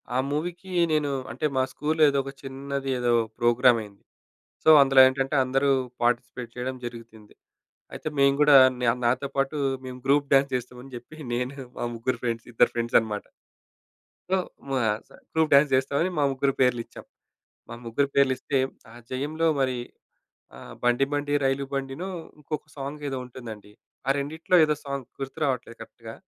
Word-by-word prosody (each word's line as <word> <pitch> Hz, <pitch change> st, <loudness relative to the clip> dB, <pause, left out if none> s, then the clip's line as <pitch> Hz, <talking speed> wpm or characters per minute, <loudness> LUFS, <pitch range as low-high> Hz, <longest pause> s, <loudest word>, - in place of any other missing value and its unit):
ఆ -, -, +2 dB
మూవీకీ 175 Hz, +5 st, -4 dB, 0.2 s
నేను 150 Hz, -2 st, +1 dB, 0.2 s
అంటే 130 Hz, +6 st, -3 dB
మా 130 Hz, -, +3 dB
స్కూల్‌లో 155 Hz, +2 st, 0 dB
ఏదో 140 Hz, 0 st, +1 dB
ఒక 135 Hz, -, -7 dB
చిన్నది 135 Hz, 0 st, -5 dB
ఏదో 120 Hz, -1 st, +1 dB, 0.3 s
ప్రోగ్రామ్ 120 Hz, 0 st, +4 dB
అయ్యింది. 100 Hz, -2 st, -13 dB, 0.6 s
సో -, -, +5 dB
అందులో 135 Hz, -1 st, +5 dB
ఏంటంటే 135 Hz, +2 st, -1 dB
అందరూ 135 Hz, +2 st, +1 dB, 0.3 s
పార్‌టిసిపేట్ 120 Hz, 0 st, -1 dB
చేయడం 130 Hz, +1 st, -3 dB
జరిగుతుంది. 115 Hz, -3 st, -10 dB, 0.6 s
అయితే -, -, -6 dB
మేము 140 Hz, 0 st, +4 dB
గూడా 145 Hz, -2 st, +8 dB, 0.2 s
న్యామ్ 120 Hz, +1 st, +1 dB
నాతో 130 Hz, +3 st, 0 dB
పాటు 135 Hz, +2 st, 0 dB, 0.3 s
మేము 125 Hz, 0 st, -7 dB
గ్రూప్ 140 Hz, 0 st, +2 dB
డాన్స్ 135 Hz, 0 st, +4 dB
చేస్తాం 125 Hz, 0 st, -5 dB
అని 135 Hz, -1 st, -14 dB
చెప్పి 120 Hz, +6 st, -11 dB, 0.2 s
నేను 125 Hz, +3 st, -2 dB, 0.2 s
మా -, -, -2 dB
ముగ్గురు 120 Hz, +1 st, -2 dB
ఫ్రెండ్స్, 115 Hz, -1 st, -3 dB
ఇద్దరు -, -, +4 dB
ఫ్రెండ్స్ 120 Hz, 0 st, +2 dB
అనమాట. 105 Hz, -2 st, -5 dB, 1.1 s
సో 190 Hz, -, +3 dB, 0.3 s
మాసా 110 Hz, -5 st, -1 dB, 0.2 s
గ్రూప్ 160 Hz, -1 st, +2 dB
డాన్స్ 140 Hz, 0 st, +6 dB
చేస్తామని 140 Hz, +7 st, +1 dB
మా 145 Hz, -, +3 dB
ముగ్గురు 135 Hz, +1 st, 0 dB
పేర్లు 125 Hz, -2 st, +3 dB
ఇచ్చాం. -, -, -13 dB, 0.6 s
మా 115 Hz, -, -7 dB
ముగ్గురు 135 Hz, +5 st, 0 dB
పేర్లు 140 Hz, -1 st, +4 dB
ఇస్తే 135 Hz, +1 st, -1 dB, 0.3 s
ఆ -, -, -14 dB, 0.2 s
జయంలో 150 Hz, +5 st, -1 dB
మరి 130 Hz, -1 st, +1 dB, 0.8 s
ఆహ్, -, -, -11 dB
'బండి 120 Hz, +2 st, +3 dB
బండి 145 Hz, 0 st, -1 dB
రైలు' 135 Hz, +1 st, 0 dB
బండిను, 135 Hz, +6 st, -4 dB, 0.3 s
ఇంకొక 150 Hz, 0 st, -6 dB
సాంగ్ 140 Hz, +2 st, -6 dB
ఏదో 135 Hz, -1 st, -3 dB
ఉంటుందండి. 110 Hz, -5 st, -10 dB, 0.4 s
ఆ -, -, +2 dB
రెండిట్లో 160 Hz, +5 st, 0 dB
ఏదో 150 Hz, -1 st, +1 dB
సాంగ్ 140 Hz, -2 st, -5 dB
గుర్తురావట్లేదు 135 Hz, -3 st, -3 dB
కరెక్ట్‌గా. 115 Hz, -1 st, -10 dB
135 Hz, 160 wpm, -26 LUFS, 120-140 Hz, 1.1 s, గూడా